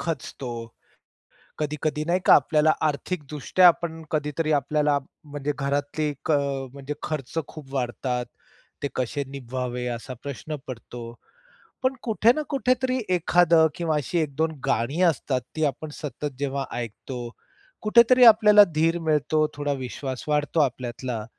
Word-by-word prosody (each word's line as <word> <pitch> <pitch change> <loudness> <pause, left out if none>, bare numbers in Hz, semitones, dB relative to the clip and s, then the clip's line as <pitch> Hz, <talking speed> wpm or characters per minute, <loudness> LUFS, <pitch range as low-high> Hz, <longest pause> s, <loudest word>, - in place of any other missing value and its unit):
खचतो. 140 -5 -4 1.1
कधी-कधी 150 0 -2
नाही 175 +3 +1
का - - +9
आपल्याला 155 0 +4 0.2
आर्थिकदृष्ट्या 150 +2 +1
आपण 165 -1 0
कधीतरी 155 +1 -1
आपल्याला 145 0 +2 0.3
म्हणजे 145 0 -3
घरातली 145 +2 -1
एक 145 +1 -5
अ, 145 - +4 0.3
म्हणजे 140 +1 -6
खर्च 155 0 -4
खूप 140 -3 -11
वाढतात. 125 -1 -2 0.6
ते 140 - 0
कसे 130 +3 -2
निभवावे? 125 -2 -4
असा 130 +3 -8
प्रश्न 140 +2 -5
पडतो. 120 -1 -8 0.8
पण 260 +1 +2
कुठे 225 0 +4
ना 305 - -1
कुठेतरी 255 -2 +1 0.2
एखादं 170 -2 +4
किंवा 165 -3 -1
अशी 150 +4 -1
1-2 155 +1 0
गाणी 125 +10 0
असतात, 130 -4 -1
ती 160 - -1
आपण 150 +2 -3
सतत 145 0 -4
जेव्हा 140 -1 -2
ऐकतो. 120 +2 -6 0.6
कुठेतरी 235 +3 +6
आपल्याला 210 -2 +8
धीर 165 +2 +2
मिळतो, 155 -1 +1
थोडा 145 0 -2
विश्वास 130 0 -5
वाढतो 150 +2 +1
आपल्यातला. 125 -4 -2
150 Hz, 130 wpm, -25 LUFS, 135-165 Hz, 1.1 s, का